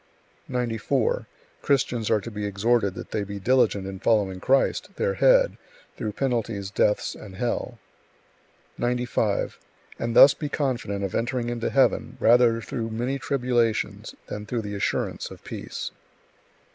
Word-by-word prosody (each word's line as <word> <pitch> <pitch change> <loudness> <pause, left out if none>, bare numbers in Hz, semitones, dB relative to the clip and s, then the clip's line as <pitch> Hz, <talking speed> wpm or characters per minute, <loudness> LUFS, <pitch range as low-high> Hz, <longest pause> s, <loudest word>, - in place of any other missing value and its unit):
94. 125 - -1 0.3
Christians 130 -5 +1
are 110 - +3
to 115 - -7
be 105 -1 -5
exhorted 100 0 +1
that - - -8
they 105 - -1
be 100 0 -6
diligent 115 -3 +2
in 95 0 -6
following 100 -4 +1
Christ, 135 +7 +2
their 485 +1 0
Head, - - +4 0.4
through 105 -1 -4
penalties, 115 -6 -2
deaths, 105 0 +1
and 100 -3 -11
hell; 120 +2 -2 1.0
95. 120 -4 0 0.4
And 115 0 -2
thus 140 - +9
be 150 - -5
confident 120 -9 -2
of 95 - -3
entering 120 +1 -1
into 120 -1 -2
heaven - - +2
rather 115 0 +5
through 115 -1 -4
many 120 +5 -2
tribulations, 125 -4 0
than 105 0 -6
through 115 -1 -2
the 105 0 -5
assurance 100 - -2
of - - -12
peace. - - -6
115 Hz, 140 wpm, -25 LUFS, 105-125 Hz, 1.0 s, thus